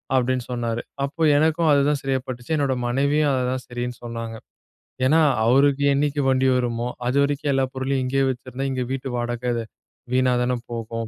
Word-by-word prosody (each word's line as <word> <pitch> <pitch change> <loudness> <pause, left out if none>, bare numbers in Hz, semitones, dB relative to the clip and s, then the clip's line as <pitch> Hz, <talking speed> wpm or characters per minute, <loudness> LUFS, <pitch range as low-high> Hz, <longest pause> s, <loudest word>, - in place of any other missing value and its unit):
அப்டின்னு 130 -1 +1
சொன்னாரு. 120 -1 -2 0.2
அப்போ 145 +4 -8 0.2
எனக்கும் 160 +2 +2
அதுதான் 145 0 +2
சரியா 135 -1 0
பட்டுச்சு, 120 +2 -7
என்னோட 140 -2 +1
மனைவியும் 140 +4 +2
அததான் 130 0 -1
சரின்னு 120 0 -4
சொன்னாங்க. 115 -1 -5 0.7
ஏன்னா, 160 +4 +4 0.2
அவருக்கு 140 +3 +4
என்னைக்கு 145 +1 0
வண்டி 130 0 +3
வருமோ 120 -1 -1 0.2
அதுவரைக்கும் 140 +2 +1
எல்லா 135 0 +2
பொருளையும் 130 0 -1
இங்கே 135 +1 +1
வச்சிருந்தா 130 +2 -5
இங்க 130 -1 -2
வீட்டு 135 0 -4
வாடகை 120 0 -2 0.6
வீணாதான 125 -1 +2
போகும். 115 -1 -4
130 Hz, 145 wpm, -23 LUFS, 120-140 Hz, 0.7 s, ஏன்னா